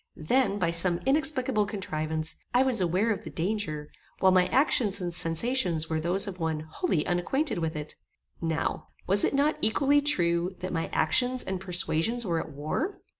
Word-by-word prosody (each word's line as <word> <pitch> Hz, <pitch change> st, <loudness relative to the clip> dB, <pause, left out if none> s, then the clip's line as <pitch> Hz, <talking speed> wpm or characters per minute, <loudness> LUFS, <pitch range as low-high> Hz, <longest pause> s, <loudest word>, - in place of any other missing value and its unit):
Then, 205 Hz, +6 st, +1 dB
by 170 Hz, -4 st, 0 dB
some 170 Hz, +1 st, +2 dB
inexplicable 265 Hz, -6 st, +1 dB
contrivance, 155 Hz, -6 st, -3 dB, 0.2 s
I 250 Hz, -, +5 dB
was 255 Hz, -6 st, +5 dB
aware 185 Hz, +6 st, +1 dB
of 210 Hz, -, -3 dB
the -, -, -7 dB
danger, 165 Hz, -5 st, -3 dB, 0.3 s
while 190 Hz, -, +4 dB
my 185 Hz, -1 st, +4 dB
actions 230 Hz, -7 st, +2 dB
and 175 Hz, -2 st, -4 dB
sensations 170 Hz, -1 st, +1 dB
were 160 Hz, -, 0 dB
those 175 Hz, +4 st, +2 dB
of 185 Hz, -2 st, -7 dB
one 160 Hz, -2 st, -2 dB
wholly 155 Hz, -, -2 dB
unacquainted 180 Hz, -, 0 dB
with 160 Hz, 0 st, -3 dB
it. 150 Hz, 0 st, -6 dB, 0.4 s
Now, 165 Hz, -1 st, -2 dB, 0.2 s
was 200 Hz, +2 st, +3 dB
it -, -, +1 dB
not 290 Hz, +2 st, +1 dB
equally 280 Hz, +6 st, +2 dB
true 175 Hz, -9 st, 0 dB
that 185 Hz, 0 st, -5 dB
my 165 Hz, -1 st, -2 dB
actions 250 Hz, +11 st, +2 dB
and 190 Hz, -2 st, -4 dB
persuasions 185 Hz, +5 st, 0 dB
were 170 Hz, -3 st, -1 dB
at -, -, -6 dB
war? 155 Hz, -, -3 dB
185 Hz, 175 wpm, -27 LUFS, 165-245 Hz, 0.4 s, I